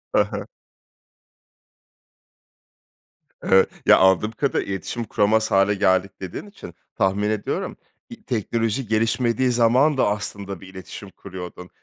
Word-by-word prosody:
Hı - - +6
hı. - - -6 3.0
Evet, 95 0 +4 0.2
ya, - - +7
anladığım 95 +3 +4
kadarıyla, 130 -3 -1
iletişim 95 +5 -4
kuramaz 110 0 +1
hâle 100 +1 +4
geldik 95 0 +2
dediğin 95 - -6
için 195 - -12 0.2
tahmin 100 +2 +1
ediyorum 135 - -3 0.3
i 235 -3 -12
teknoloji 115 - -1
gelişmediği 115 +3 +1
zaman 125 +5 +3
da, - - +3
aslında, 100 -2 -4
bir 95 - -11
iletişim 95 +1 -10
kuruyordun. 90 -1 -9
105 Hz, 115 wpm, -23 LUFS, 95-120 Hz, 3.0 s, ya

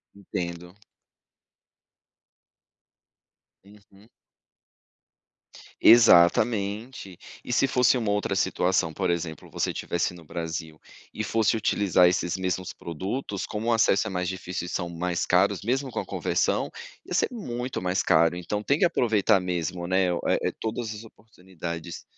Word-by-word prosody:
Entendo. 90 -2 -6 2.9
Uhum. 100 +1 -20 1.7
Exatamente. 105 0 +4 0.3
E 125 - -3
se 135 - +3
fosse 125 0 +3
uma 110 -3 -2
outra 105 -1 -1
situação, 90 -2 +1
por 95 -2 -1
exemplo, 80 -3 -4
você - - -1
estivesse 85 +1 -2
no 85 -2 -13
Brasil, 80 -1 -5 0.3
e 110 - -3
fosse 115 +1 +1
utilizar 100 -4 +3
esses 90 -1 -1
mesmos 95 -1 -3
produtos, 95 - -5
como 110 +2 -5
o - - +3
acesso 110 -1 +3
é - - -3
mais 90 -1 -2
difícil 90 -1 -4
e - - -7
são 85 -1 -3
mais 85 +1 -2
caros, - - +2
mesmo 130 +4 -1
com - - -3
a - - -4
conversão, - - 0 0.4
ia - - -7
ser - - +2
muito 125 - -4
mais 90 +1 0
caro, 85 +1 +3
então 95 +4 -4
tem 140 +7 +1
que - - +5
aproveitar 110 - +2
mesmo, 90 -1 -3
né, 95 +1 +2
eh, 85 - 0
todas 110 0 -3
as 105 - -9
oportunidades. 90 -6 -9
95 Hz, 135 wpm, -26 LUFS, 85-110 Hz, 2.9 s, que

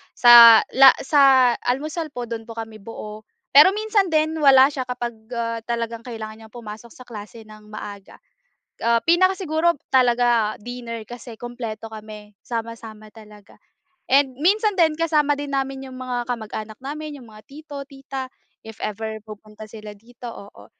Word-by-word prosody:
sa 235 -2 +9
la 265 0 +7
sa 270 -3 +5 0.2
almusal 305 +4 -3
po 245 - -4
dun 230 -1 -7
po 230 - -9
kami 225 -1 -8
buo. 215 0 -10 0.2
Pero 300 +8 +7
minsan 425 -2 +1
din 315 -1 0
wala 275 -1 +6
siya 260 -3 -5
kapag, 245 -1 -4 0.2
ah, 230 -1 -3
talagang 230 -1 -3
kailangan 220 -2 -9
niyang 220 - -24
pumasok 225 0 -10
sa 255 - -12
klase 225 -1 -11
ng 215 0 -16
maaga. 205 -2 -10 0.6
Ah, 230 0 +1
pinakasiguro 345 -2 +2 0.2
talaga 240 -4 +2
dinner 235 -1 -7
kasi 240 +1 -11
kumpleto 225 -2 -7
kami 210 -1 -12
sama-sama 225 -2 -7
talaga. 210 -2 -17 0.5
And 270 0 +3
minsan 420 +5 +2
din 325 -5 +2
kasama 300 -3 +1
din 285 -1 -6
namin 270 0 -3
yung 260 -1 -10
mga 245 -1 -3
kamag-anak 220 -2 -6
namin, 295 +1 -7
iyong 235 - -15
mga 215 0 -15
tito, 285 -1 -10
tita 270 -2 -8 0.3
if 220 -1 -11
ever 220 +1 -5
pupunta 215 0 -12
sila 210 -1 -10
dito, 240 +4 -15
oo. 200 - -14
240 Hz, 155 wpm, -22 LUFS, 220-275 Hz, 0.6 s, sa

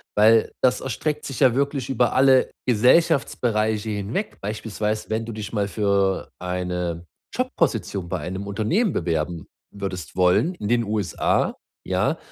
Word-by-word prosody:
Weil, 110 +1 +5
das 125 0 +3
erstreckt 150 +4 -3
sich 135 -4 -5
ja 125 -2 +5
wirklich 140 -2 -1
über 125 -2 +2
alle 130 -1 +4 0.2
Gesellschaftsbereiche 115 -4 +2
hinweg. 105 - -3
Beispielsweise, 105 +1 -3
wenn 110 +1 -1
du 115 - -6
dich 105 -1 -6
mal 100 -2 0
für 100 -2 0
eine 90 -2 -3 0.3
Jobposition 95 -3 -1
bei - - -2
einem 95 +2 -5
Unternehmen 140 - 0
bewerben 85 0 -2 0.2
würdest 95 -5 -6
wollen, 90 - +3
in 105 - -5
den 120 +1 +2
USA, 105 -5 0 0.3
ja? - - 0
110 Hz, 135 wpm, -23 LUFS, 95-125 Hz, 0.3 s, Weil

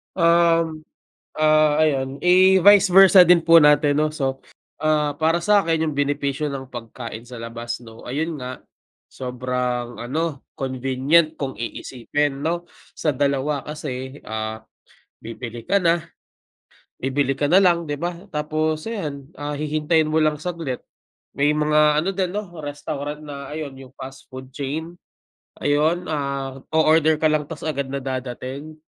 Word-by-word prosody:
Um, 165 -2 +3 0.5
ah, 155 0 +3
ayun, 135 -2 0
eh, 185 +1 +5
vice 205 +2 +7
versa 190 -1 +8
din 175 -1 +5
po 165 0 +6
natin 150 -2 +5
no 155 0 +1
so, 135 -3 -3 0.3
ah, 150 -2 0
para 165 +2 +1
sa'kin 170 -5 +2
yung 140 - -6
benepisyo 140 0 -1
ng 130 -1 -6
pagkain 115 -1 -8
sa 120 -1 -9
labas 115 +1 -5
no, 115 -1 -13
ayun 155 +5 -3
nga 125 0 -7 0.5
sobrang 125 -1 -3
ano, 150 +4 -3
convenient 135 +5 +1
kung 135 -4 -5
iisipin 135 +5 -3
no 175 +1 -2 0.2
sa 155 - -1
dalawa 140 +1 0
kasi, 140 -2 -6
ah, 110 0 -5 0.6
bibili 115 +1 -7
ka 200 - +2
na 170 -3 +2 1.0
bibili 135 +1 0
ka 145 +1 -1
na 185 - +7
lang, 170 -4 +2
di 145 - -2
ba? 175 +2 -2 0.2
Tapos 155 +1 -2
ayan, 150 -12 -5
ah, 145 0 -5
hihintayin 155 +1 +1
mo 155 +1 +1
lang 155 -1 +1
saglit, 165 -6 -4 0.6
may 145 +1 +2
mga 150 0 +3
ano 190 +5 -1
din 185 -2 -1
'no 200 -3 -5
restaurant 145 0 -5
na 140 -2 -8
ayun 150 -2 -5
yung 135 -1 -12
fast 135 +2 -10
food 130 0 -10
chain, 155 +5 -4 0.6
ayun, 155 +5 +1
ah, 140 -3 -3
o-order 160 0 +4
ka 155 - +1
lang 155 -1 +2
ta's 160 0 -7
agad 140 -3 -2
na 140 - -2
dadating, 130 +3 -5
150 Hz, 145 wpm, -22 LUFS, 135-160 Hz, 1.0 s, versa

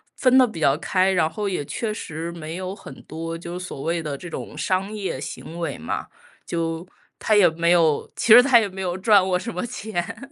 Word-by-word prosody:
分 255 0 +4
得 255 -1 +6
比 190 -8 -8
较 140 -1 +4
开， 185 +3 +1
然 165 -4 +2
后 205 +5 -3
也 180 -6 -3
确 215 +8 -3
实 165 -5 -5
没 165 -1 -7
有 185 +1 -4
很 135 -8 -12
多 165 +1 -6
就 170 +1 -7
所 180 -6 -7
谓 165 +3 -1
的 150 -3 -4
这 175 - -9
种 - - -7
商 190 +1 0
业 205 -10 -4
行 165 +4 -7
为 170 - -3
嘛， 80 - -4 0.4
就 165 +1 -3 0.3
他 215 - +2
也 205 -4 +6
没 170 +1 +1
有 165 -4 +3
其 230 -2 +5
实 245 - +11
他 260 -1 +5
也 205 - -2
没 190 0 -7
有 180 -1 -2
赚 200 -1 +5
过 185 -1 +2
什 180 - -6
么 180 +6 -3
钱， 220 +3 -5
180 Hz, 240 characters per minute, -23 LUFS, 165-200 Hz, 0.4 s, 实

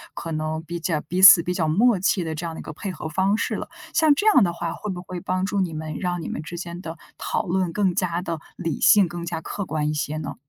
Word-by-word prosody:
可 165 - -6
能 155 0 -3
比 170 +1 -5
较 165 -2 -1
彼 180 +5 -3
此 190 -2 +10
比 180 - -2
较 170 -3 0
默 225 -1 +4
契 185 -1 +1
的 160 - -3
这 165 +3 -5
样 165 - -6
的 - - -8
一 - - -10
个 - - -7
配 195 +5 -5
合 160 - -6
方 190 +5 +1
式 - - -2
了。 - - -5 0.3
像 315 -3 +5
这 410 - -2
样 405 - +6
的 175 -2 0
话， 170 -1 -4
会 210 - -6
不 175 -1 -6
会 185 0 -6
帮 185 +2 -1
助 200 0 0
你 170 -3 -2
们， 155 -1 -5
让 180 -2 -2
你 - - -5
们 - - -4
之 165 +3 -8
间 170 0 -6
的 165 -2 -7 0.2
讨 - - -1
论 180 0 0
更 195 -3 +1
加 175 -2 -1
地 165 -4 -4 0.2
理 165 -4 -3
性， 205 -3 +6
更 175 0 -6
加 170 -1 -3
客 200 +4 -5
观 150 -2 -2
一 - - -1
些 150 0 -2
呢？ 155 -2 -5
175 Hz, 305 characters per minute, -23 LUFS, 160-190 Hz, 0.3 s, 此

